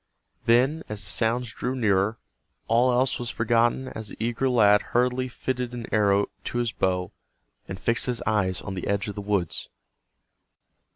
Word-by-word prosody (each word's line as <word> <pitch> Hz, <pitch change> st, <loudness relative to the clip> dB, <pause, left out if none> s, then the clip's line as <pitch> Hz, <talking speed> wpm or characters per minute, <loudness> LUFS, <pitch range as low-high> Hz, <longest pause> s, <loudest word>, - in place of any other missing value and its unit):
Then, 130 Hz, +7 st, +4 dB
as 105 Hz, -1 st, -4 dB
the -, -, -5 dB
sounds 120 Hz, +1 st, 0 dB
drew 125 Hz, +1 st, -3 dB
nearer, 110 Hz, -2 st, +2 dB, 0.5 s
all 120 Hz, +3 st, +4 dB
else 125 Hz, +2 st, +1 dB
was 120 Hz, -1 st, -4 dB
forgotten 120 Hz, +3 st, +1 dB
as 110 Hz, -1 st, -7 dB
the -, -, -10 dB
eager 120 Hz, +4 st, 0 dB
lad 105 Hz, -4 st, +5 dB, 0.2 s
hurriedly 125 Hz, +1 st, +2 dB
fitted 125 Hz, -1 st, -3 dB
an 120 Hz, -2 st, -5 dB
arrow 100 Hz, -1 st, +3 dB, 0.2 s
to -, -, -3 dB
his 120 Hz, -2 st, 0 dB
bow, 90 Hz, -3 st, -1 dB, 0.6 s
and 95 Hz, -, -6 dB
fixed 115 Hz, +5 st, 0 dB
his 125 Hz, -2 st, -2 dB
eyes 95 Hz, -4 st, +1 dB
on 95 Hz, -, -5 dB
the 90 Hz, -, -4 dB
edge 100 Hz, 0 st, 0 dB
of 105 Hz, -, -4 dB
the 105 Hz, -, -6 dB
woods. 100 Hz, -4 st, -1 dB
115 Hz, 170 wpm, -26 LUFS, 100-125 Hz, 0.6 s, lad